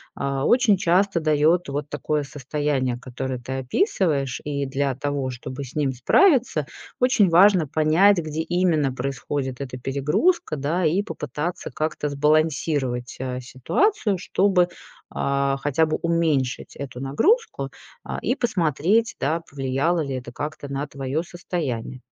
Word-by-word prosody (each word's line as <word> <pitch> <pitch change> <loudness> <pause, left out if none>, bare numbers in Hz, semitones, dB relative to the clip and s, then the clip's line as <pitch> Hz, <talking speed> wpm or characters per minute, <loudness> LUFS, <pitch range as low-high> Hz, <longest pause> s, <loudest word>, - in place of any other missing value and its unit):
а, 140 0 -2
очень 240 -5 +4
часто 180 +1 +2
даёт 155 +3 +2
вот 145 +1 -4
такое 145 +1 -1
состояние, 135 -2 -2 0.2
которое 130 -1 -2
ты 125 +2 -6
описываешь. 140 - 0
И 140 -1 -2
для 135 0 0
того 140 -1 -2
чтобы 130 +3 -7
с 130 - -10
ним 145 -3 +1
справиться, 195 - +3 0.3
очень 250 -6 +4
важно 180 -1 +5
понять, 160 +7 +4
где 155 -1 -3
именно 165 -6 +1
происходит 135 0 -3
эта 130 -2 -5
перегрузка, 150 - +1
да, 155 +5 -1
и 170 +6 +2
попытаться 150 - -5
как-то 155 -1 -2
сбалансировать, 145 -4 0
э, 125 -1 -3
ситуацию, 200 - 0
чтобы, 185 -1 +2 0.4
а, 140 0 0
хотя 145 +2 +2
бы 155 - -1
уменьшить 160 -7 0
эту 130 -3 -7
нагрузку, 370 - +1 0.3
а, - - -5
и 250 - 0
посмотреть, 200 - +1
да, 160 +4 0
повлияло 140 +5 0
ли 140 -3 -3
это 125 -1 -6
как-то 145 +2 -5
на 140 +1 -2
твоё 140 +2 -3
состояние. 145 -9 -4
150 Hz, 135 wpm, -23 LUFS, 135-175 Hz, 0.4 s, важно